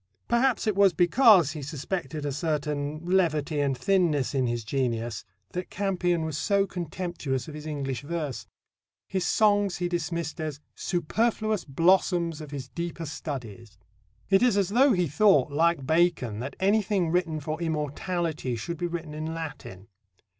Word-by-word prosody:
Perhaps 240 Hz, +1 st, +2 dB
it 215 Hz, -3 st, +1 dB
was 200 Hz, -2 st, +5 dB
because 180 Hz, -, +5 dB
he 155 Hz, -1 st, -6 dB
suspected 155 Hz, +2 st, -4 dB
a 145 Hz, -, -1 dB
certain 150 Hz, 0 st, -2 dB
levity 160 Hz, -5 st, +1 dB
and 140 Hz, -2 st, +1 dB
thinness 165 Hz, -5 st, +1 dB
in 130 Hz, -2 st, +1 dB
his 120 Hz, -1 st, -2 dB
genius 115 Hz, -2 st, -2 dB, 0.3 s
that 180 Hz, 0 st, -4 dB
Campion 180 Hz, -4 st, 0 dB
was 155 Hz, -2 st, -3 dB
so 200 Hz, -2 st, +2 dB
contemptuous 170 Hz, -7 st, -4 dB
of 155 Hz, -, -8 dB
his 150 Hz, 0 st, -8 dB
English 135 Hz, -5 st, -3 dB
verse. 150 Hz, -3 st, -4 dB, 0.6 s
His 190 Hz, -1 st, -1 dB
songs 205 Hz, -3 st, +3 dB
he 175 Hz, -, -1 dB
dismissed 170 Hz, -2 st, -3 dB
as 155 Hz, -2 st, -4 dB
"superfluous 215 Hz, +4 st, -1 dB
blossoms 170 Hz, +1 st, +2 dB
of 150 Hz, -, -8 dB
his 140 Hz, -3 st, -6 dB
deeper 170 Hz, +2 st, -5 dB
studies." 120 Hz, -8 st, -7 dB, 0.5 s
It 195 Hz, +1 st, +4 dB
is 245 Hz, -5 st, +4 dB
as 195 Hz, -2 st, +2 dB
though 255 Hz, +5 st, +5 dB
he 180 Hz, -2 st, +2 dB
thought, 150 Hz, -3 st, +4 dB
like 160 Hz, -1 st, +2 dB
Bacon, 160 Hz, -9 st, +1 dB
that 135 Hz, +3 st, -5 dB
anything 195 Hz, -3 st, +2 dB
written 170 Hz, -3 st, 0 dB
for 155 Hz, +3 st, -4 dB
immortality 160 Hz, -2 st, -2 dB
should 140 Hz, +9 st, -5 dB
be 175 Hz, -, -1 dB
written 165 Hz, -3 st, -5 dB
in 155 Hz, +1 st, -4 dB
Latin. 140 Hz, -, -7 dB
165 Hz, 155 wpm, -27 LUFS, 145-180 Hz, 0.6 s, was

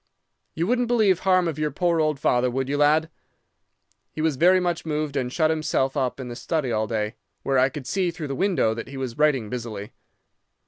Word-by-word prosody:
You 165 Hz, -, 0 dB
wouldn't 245 Hz, +3 st, +1 dB
believe 215 Hz, -7 st, +3 dB
harm 185 Hz, -2 st, +3 dB
of 155 Hz, -2 st, -3 dB
your 155 Hz, 0 st, 0 dB
poor 170 Hz, +3 st, 0 dB
old 155 Hz, -2 st, 0 dB
father, 125 Hz, 0 st, +2 dB
would 130 Hz, +1 st, -2 dB
you, 145 Hz, +1 st, -1 dB
lad?" 155 Hz, +3 st, +3 dB, 1.0 s
He -, -, -10 dB
was 155 Hz, -2 st, +1 dB
very 180 Hz, +6 st, +5 dB
much 175 Hz, -2 st, -1 dB
moved, 150 Hz, -2 st, -2 dB
and 125 Hz, -3 st, -1 dB
shut 155 Hz, +2 st, +2 dB
himself 155 Hz, -4 st, 0 dB
up 130 Hz, -2 st, -1 dB
in 130 Hz, -, -6 dB
the 120 Hz, -, -6 dB
study 150 Hz, -1 st, -2 dB
all 110 Hz, -1 st, 0 dB
day, 110 Hz, 0 st, -2 dB, 0.3 s
where 135 Hz, -1 st, +2 dB
I 130 Hz, +1 st, +4 dB
could 140 Hz, -1 st, -8 dB
see 185 Hz, +6 st, 0 dB
through 165 Hz, -4 st, -6 dB
the -, -, -2 dB
window 175 Hz, -, +1 dB
that 115 Hz, 0 st, -6 dB
he 135 Hz, -, -8 dB
was 130 Hz, -1 st, -5 dB
writing 140 Hz, -7 st, +2 dB
busily. 110 Hz, -3 st, -6 dB
150 Hz, 215 wpm, -24 LUFS, 130-165 Hz, 1.0 s, very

